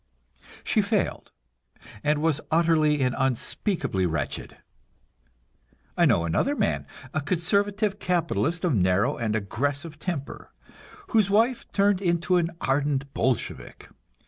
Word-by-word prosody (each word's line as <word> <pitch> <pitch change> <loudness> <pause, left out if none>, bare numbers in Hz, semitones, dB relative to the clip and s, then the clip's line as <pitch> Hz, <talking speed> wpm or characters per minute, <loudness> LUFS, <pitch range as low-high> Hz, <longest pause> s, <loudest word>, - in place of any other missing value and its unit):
She - - +2
failed, - - -1 0.7
and 150 +1 +1
was 155 -2 +1
utterly 155 -3 +3
and 125 0 +1
unspeakably 130 - -1
wretched. 80 -4 -4 1.4
I - - +4
know 85 - +3
another 265 - +1
man, - - -1 0.3
a 155 - 0
conservative 200 +5 0
capitalist 175 -1 0
of 170 - +2
narrow 95 +1 +2
and 110 -2 -1
aggressive 145 +9 -3
temper, 150 -5 -5 0.6
whose 215 - +3
wife 230 +5 +1
turned 200 -1 +2
into 175 0 +2
an 170 -1 +1
ardent 140 0 0
Bolshevik. 125 -1 -2
155 Hz, 115 wpm, -26 LUFS, 130-185 Hz, 1.4 s, I